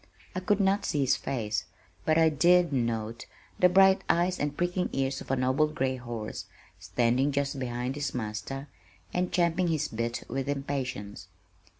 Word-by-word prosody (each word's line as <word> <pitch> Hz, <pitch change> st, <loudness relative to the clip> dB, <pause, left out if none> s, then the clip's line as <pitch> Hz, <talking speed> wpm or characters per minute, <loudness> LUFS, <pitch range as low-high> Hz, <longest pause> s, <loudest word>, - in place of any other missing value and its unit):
I -, -, 0 dB
could 200 Hz, +2 st, +1 dB
not 195 Hz, +1 st, +2 dB
see 145 Hz, -, 0 dB
his 130 Hz, -, +3 dB
face, 110 Hz, -6 st, -2 dB, 0.4 s
but 155 Hz, 0 st, +3 dB
I 160 Hz, -1 st, +6 dB
did 170 Hz, +2 st, +4 dB
note 115 Hz, -2 st, -2 dB, 0.3 s
the 180 Hz, -, +6 dB
bright 190 Hz, +1 st, +5 dB
eyes 175 Hz, +2 st, +2 dB
and 145 Hz, 0 st, -2 dB
pricking 180 Hz, +1 st, 0 dB
ears 135 Hz, 0 st, -1 dB
of -, -, -10 dB
a 135 Hz, -, +2 dB
noble 130 Hz, +4 st, +2 dB
gray 135 Hz, -4 st, -1 dB
horse 120 Hz, -3 st, -6 dB, 0.3 s
standing 120 Hz, +9 st, +1 dB
just 140 Hz, 0 st, -1 dB
behind 125 Hz, 0 st, -2 dB
his 145 Hz, -1 st, -3 dB
master 120 Hz, +5 st, -4 dB, 0.5 s
and 180 Hz, 0 st, 0 dB
champing 175 Hz, 0 st, +2 dB
his 155 Hz, -3 st, 0 dB
bit 115 Hz, +1 st, -3 dB
with 135 Hz, +2 st, -3 dB
impatience. 130 Hz, -8 st, -4 dB
135 Hz, 165 wpm, -28 LUFS, 120-170 Hz, 0.5 s, I